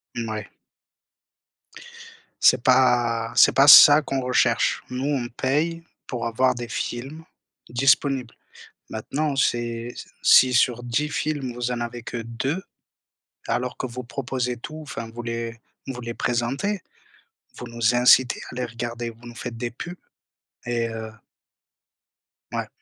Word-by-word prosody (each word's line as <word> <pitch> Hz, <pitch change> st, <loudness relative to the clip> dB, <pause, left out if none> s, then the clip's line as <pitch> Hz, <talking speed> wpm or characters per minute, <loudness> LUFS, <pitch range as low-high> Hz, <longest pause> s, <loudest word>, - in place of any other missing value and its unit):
Mouais. 110 Hz, -2 st, -4 dB, 1.9 s
C'est 125 Hz, -, +5 dB
pas 120 Hz, -3 st, +3 dB
c'est -, -, +7 dB
pas 135 Hz, +1 st, +5 dB
ça 145 Hz, +1 st, +10 dB
qu'on 135 Hz, -2 st, -3 dB
recherche. 125 Hz, 0 st, +1 dB
Nous, 125 Hz, +1 st, -4 dB
on 140 Hz, -4 st, -1 dB
paye 150 Hz, +7 st, -1 dB, 0.2 s
pour 120 Hz, -2 st, -3 dB
avoir 125 Hz, +3 st, +1 dB
des 120 Hz, 0 st, -6 dB
films 135 Hz, +7 st, -5 dB, 0.5 s
disponibles. 130 Hz, 0 st, +1 dB, 0.6 s
Maintenant, 140 Hz, +6 st, -3 dB
c'est 120 Hz, -2 st, -1 dB, 0.3 s
si, 130 Hz, -1 st, +6 dB
sur 120 Hz, 0 st, +2 dB
10 125 Hz, +5 st, -1 dB
films 145 Hz, -5 st, -2 dB
vous 120 Hz, 0 st, -3 dB
en 120 Hz, -1 st, -3 dB
avez 120 Hz, 0 st, -5 dB
que 120 Hz, -, -6 dB
2, 130 Hz, +9 st, -3 dB, 0.9 s
alors 125 Hz, 0 st, -2 dB
que -, -, -3 dB
vous 125 Hz, +1 st, -7 dB
proposez 125 Hz, -1 st, -3 dB
tout, 155 Hz, +6 st, -8 dB
enfin, 115 Hz, -6 st, -7 dB
vous 120 Hz, -, -6 dB
les 115 Hz, 0 st, -5 dB, 0.3 s
vous 130 Hz, -2 st, -6 dB
les 115 Hz, 0 st, -5 dB
présentez, 135 Hz, -, -2 dB, 0.7 s
vous -, -, -8 dB
nous 115 Hz, 0 st, 0 dB
incitez 125 Hz, +1 st, +5 dB
à -, -, -10 dB
les 125 Hz, 0 st, -2 dB
regarder, 120 Hz, 0 st, -5 dB
vous 115 Hz, +1 st, -15 dB
nous 120 Hz, -, -11 dB
faites 120 Hz, 0 st, -7 dB
des 120 Hz, +1 st, -4 dB
pubs 175 Hz, +9 st, -8 dB, 0.7 s
et 120 Hz, -1 st, -1 dB
heu 110 Hz, -1 st, -7 dB, 1.4 s
Ouais. -, -, -3 dB
120 Hz, 135 wpm, -23 LUFS, 115-135 Hz, 1.9 s, ça